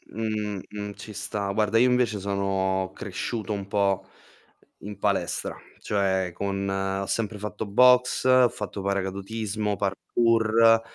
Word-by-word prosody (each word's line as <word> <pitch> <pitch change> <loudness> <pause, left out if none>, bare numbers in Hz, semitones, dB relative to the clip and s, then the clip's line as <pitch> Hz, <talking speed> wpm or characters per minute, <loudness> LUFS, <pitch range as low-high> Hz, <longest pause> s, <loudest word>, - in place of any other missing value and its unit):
m 105 -3 -2
m - - -16
mh, 105 -1 -5
mh, - - -8
ci 105 - -10
sta. 100 0 -3
Guarda, 105 +1 +2
io 125 +2 +5
invece 125 -4 +1
sono 95 -1 -1
cresciuto 110 -2 -4
un 100 -1 -5
po' 100 -1 +1 0.7
in 105 -1 -8
palestra, - - -1 0.2
cioè 95 -3 0
con 100 +1 -2
ho 95 0 -1
sempre 105 0 -2
fatto 105 +1 -5
boxe, 125 +4 +4
ho 130 -1 +6
fatto 105 -2 -6
paracadutismo, 100 +2 -2
parkour. 115 +3 +3
105 Hz, 135 wpm, -26 LUFS, 100-110 Hz, 0.7 s, ho